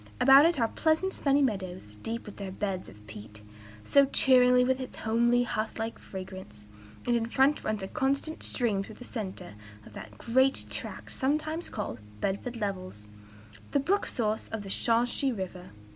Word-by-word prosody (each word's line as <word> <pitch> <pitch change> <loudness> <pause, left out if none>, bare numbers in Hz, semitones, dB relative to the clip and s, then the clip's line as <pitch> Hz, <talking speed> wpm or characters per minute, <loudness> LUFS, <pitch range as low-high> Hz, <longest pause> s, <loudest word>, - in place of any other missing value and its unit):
About 275 +4 +8
it 335 -4 0
are 230 - +3
pleasant 320 +9 +1
sunny 280 0 +2
meadows, 185 - -3
deep 230 +1 -4
with 210 - -10
their 200 -2 -5
beds 190 -1 -3
of 105 +1 -16
peat, 105 0 -11 0.4
so 280 - +5
cheering 250 -2 +5
with 260 +1 +1
its 260 - -7
homely, 235 +2 +2
hearth 220 -2 -3
like 225 0 -4
fragrance; 185 - -9 0.4
and 240 - +2
in 230 -1 0
front 270 +5 +2
runs 215 -2 -2
a - - -3
constant 275 +7 -1
stream 215 -6 0
through 215 +2 -11
the 245 - -11
centre 205 - -6 0.3
of - - -14
that 105 -1 -10
great 260 - +2
tract - - -4
sometimes 310 +5 -1
called 195 - -5 0.2
'Bedford 200 - -2
levels,' 185 - -5 0.7
the 285 - +4
brook 380 +9 +1
a - - -2
source 220 -2 -1
of 225 -2 -5
the 195 - -8
Shawsheen 240 +4 +1
River." 180 -1 -6
230 Hz, 175 wpm, -29 LUFS, 195-265 Hz, 0.7 s, About